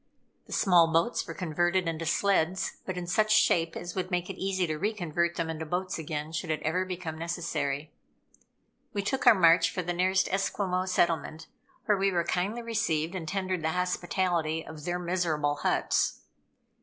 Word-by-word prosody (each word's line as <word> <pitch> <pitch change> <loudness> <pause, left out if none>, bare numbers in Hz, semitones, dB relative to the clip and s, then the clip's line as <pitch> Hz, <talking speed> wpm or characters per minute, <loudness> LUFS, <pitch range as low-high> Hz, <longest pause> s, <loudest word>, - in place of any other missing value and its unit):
The - - -15
small 170 -4 +4
boats 165 +9 +1
were - - -6
converted 175 +1 0
into 165 0 -3
sleds, 190 0 +1
but 185 -1 -3
in 180 - -3
such 215 +5 +1
shape 170 -6 +3
as 175 - -6
would 185 -1 -3
make 180 0 -1
it 190 - -11
easy 190 -1 0
to 155 -2 -3
re 210 +6 0
convert 170 -3 -1
them 165 - -1
into 160 0 -4
boats 180 +3 -2
again, 155 0 -4
should 165 +1 -4
it 155 - 0
ever 180 +4 0
become 175 -4 -5
necessary. 155 -4 -3 1.0
We 200 -1 -1
took 265 +6 -1
our 225 - +9
march 170 -2 +5
for 185 - -3
the 175 +1 -2
nearest 185 +2 +2
Esquimaux 190 -1 0
settlement, 165 -3 0 0.4
where 210 -4 +2
we 195 0 +2
were 175 -2 +1
kindly 200 +7 -1
received 175 -8 -1
and 175 -4 -5
tendered 185 0 -2
the 160 0 -1
hospitality 175 -3 -1
of 155 -1 -9
their 175 0 -1
miserable 170 -5 0
huts. - - 0
175 Hz, 180 wpm, -29 LUFS, 160-185 Hz, 1.0 s, our